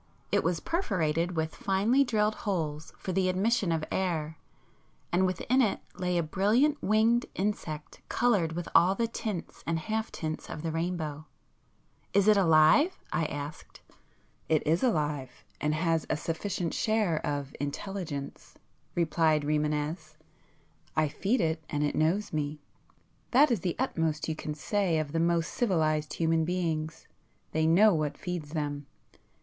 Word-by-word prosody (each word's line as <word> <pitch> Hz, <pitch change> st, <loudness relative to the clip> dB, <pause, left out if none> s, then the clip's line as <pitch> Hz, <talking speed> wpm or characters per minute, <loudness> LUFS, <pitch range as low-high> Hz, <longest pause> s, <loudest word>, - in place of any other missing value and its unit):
It -, -, +2 dB
was 165 Hz, +1 st, 0 dB
perforated 175 Hz, -, 0 dB
with 160 Hz, 0 st, -1 dB
finely 210 Hz, +8 st, +2 dB
drilled 215 Hz, -4 st, +1 dB
holes 160 Hz, -7 st, -3 dB
for 190 Hz, -, -4 dB
the 185 Hz, 0 st, +1 dB
admission 200 Hz, +1 st, +1 dB
of 160 Hz, -1 st, 0 dB
air, 160 Hz, -5 st, -1 dB, 0.7 s
and 185 Hz, +2 st, +3 dB
within 225 Hz, +9 st, +1 dB
it 215 Hz, -5 st, +1 dB
lay 180 Hz, -1 st, -1 dB
a 170 Hz, -, +2 dB
brilliant 220 Hz, -, +2 dB
winged 225 Hz, +3 st, +3 dB
insect 175 Hz, -6 st, -3 dB
coloured 205 Hz, -10 st, +2 dB
with 175 Hz, +1 st, -4 dB
all 185 Hz, +3 st, +5 dB
the 230 Hz, +2 st, 0 dB
tints 215 Hz, -5 st, -5 dB
and 165 Hz, 0 st, +1 dB
half 220 Hz, +6 st, -2 dB
tints 155 Hz, -1 st, -5 dB
of 155 Hz, -, -6 dB
the 165 Hz, -, -1 dB
rainbow. 160 Hz, -2 st, -3 dB, 0.9 s
"Is 200 Hz, +1 st, +4 dB
it 215 Hz, -, +7 dB
alive?" 170 Hz, -, +5 dB, 0.2 s
I 165 Hz, -, +1 dB
asked. 145 Hz, +1 st, -7 dB, 0.7 s
"It 155 Hz, -2 st, +2 dB
is 160 Hz, +3 st, +2 dB
alive, 145 Hz, -, -1 dB, 0.2 s
and 150 Hz, +1 st, +1 dB
has 165 Hz, -1 st, 0 dB
a -, -, +1 dB
sufficient 165 Hz, +2 st, -3 dB
share 215 Hz, -8 st, +1 dB
of 145 Hz, -2 st, -3 dB
intelligence,"—replied 155 Hz, 0 st, -2 dB
Rimânez. 150 Hz, +2 st, -1 dB, 0.8 s
"I 155 Hz, -1 st, +2 dB
feed 210 Hz, -, 0 dB
it 160 Hz, -1 st, 0 dB
and 145 Hz, 0 st, -1 dB
it 145 Hz, -, 0 dB
knows 175 Hz, +6 st, +1 dB
me,—that 155 Hz, -, -1 dB
is 230 Hz, -, +2 dB
the 175 Hz, 0 st, -2 dB
utmost 160 Hz, -, -1 dB
you 160 Hz, -, -1 dB
can 150 Hz, -1 st, -5 dB
say 185 Hz, +1 st, 0 dB
of 155 Hz, -2 st, -2 dB
the 165 Hz, -, 0 dB
most 170 Hz, 0 st, +1 dB
civilized 155 Hz, -8 st, +1 dB
human 165 Hz, -1 st, +1 dB
beings; 160 Hz, -3 st, -2 dB, 0.4 s
they 160 Hz, 0 st, +1 dB
know 200 Hz, +6 st, +6 dB
what 150 Hz, -3 st, -1 dB
feeds 170 Hz, -4 st, -5 dB
them. 145 Hz, -2 st, -3 dB
165 Hz, 145 wpm, -29 LUFS, 155-200 Hz, 0.9 s, it